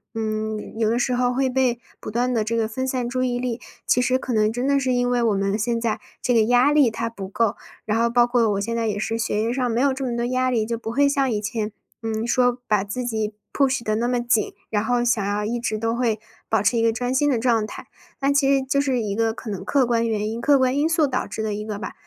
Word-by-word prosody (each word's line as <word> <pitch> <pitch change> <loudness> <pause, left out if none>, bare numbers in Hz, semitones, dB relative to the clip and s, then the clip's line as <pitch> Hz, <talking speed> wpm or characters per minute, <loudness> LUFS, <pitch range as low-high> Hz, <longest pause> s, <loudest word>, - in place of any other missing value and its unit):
嗯， 220 0 -3
有 220 -1 +2
的 235 - +1
时 250 +1 0
候 245 0 +1
会 265 0 +1
被 255 -2 +1 0.2
不 - - -7
断 245 +3 0
地 225 - +1
这 220 +2 -1
个 225 -1 0
分 260 +3 -3
散 250 -2 -1
注 255 0 -1
意 245 -1 0
力， 245 -1 -3 0.3
其 250 - +3
实 255 +1 +2
可 260 -1 -5
能 215 -1 +3
真 245 +3 -2
的 280 0 +3
是 260 -2 0
因 245 0 +1
为 245 -1 +1
我 220 -3 +2
们 195 +1 0
现 230 +1 0
在， 225 -2 -1 0.2
这 245 - +1
个 225 - +5
压 245 +5 +4
力 290 -5 +5
它 230 +1 -3
不 200 -4 -7
够。 210 +2 0 0.3
然 220 +1 0
后 235 0 +3
包 240 0 +4
括 240 -2 +2
我 200 0 -1
现 230 +2 -2
在 230 -1 0
也 205 -1 -1
是， 225 +2 -2
学 220 -2 0
业 230 - 0
上 250 -1 0
没 235 +3 +1
有 275 -1 +3
这 270 0 -4
么 240 -2 -2
多 235 - -1
压 255 +1 +1
力， 225 -3 +1
就 230 +1 -2
不 225 - -6
会 280 +5 +3
像 275 -1 +1
以 215 -3 -1
前， 210 0 -3 0.3
嗯， 225 0 -2
说 245 +1 +2
把 210 -3 +1
自 250 +5 -4
己 220 -3 -2 0.2
push 270 -3 +1
地 215 0 0
那 235 +2 0
么 245 -1 0
紧， 235 -3 +1 0.2
然 210 0 0
后 245 0 +1
想 225 -4 +1
要 205 +1 -1
一 235 +3 -2
直 220 -2 -2
都 225 +1 -1
会 230 -3 0 0.3
保 220 -3 +2
持 225 +4 +2
一 230 - +2
个 230 0 +3
专 245 +2 -2
心 290 +3 +2
的 255 - +2
状 225 -2 +1
态。 - - -9 0.3
但 275 +1 +2
其 280 -1 +3
实 275 -1 +3
就 270 +1 0
是 265 -3 +1
一 210 -2 -2
个 225 -1 +1
可 225 - -8
能 195 -3 -5
客 275 -3 +3
观 230 -1 +1
原 215 -1 -1
因 225 +1 -4
客 280 +3 +4
观 260 +1 +2
因 295 +2 +2
素 325 -1 +3
导 255 -2 -2
致 220 - -4
的 215 -1 -1
一 210 +1 -4
个 210 -2 -4
吧。 205 - -5
235 Hz, 315 characters per minute, -23 LUFS, 220-255 Hz, 0.3 s, 个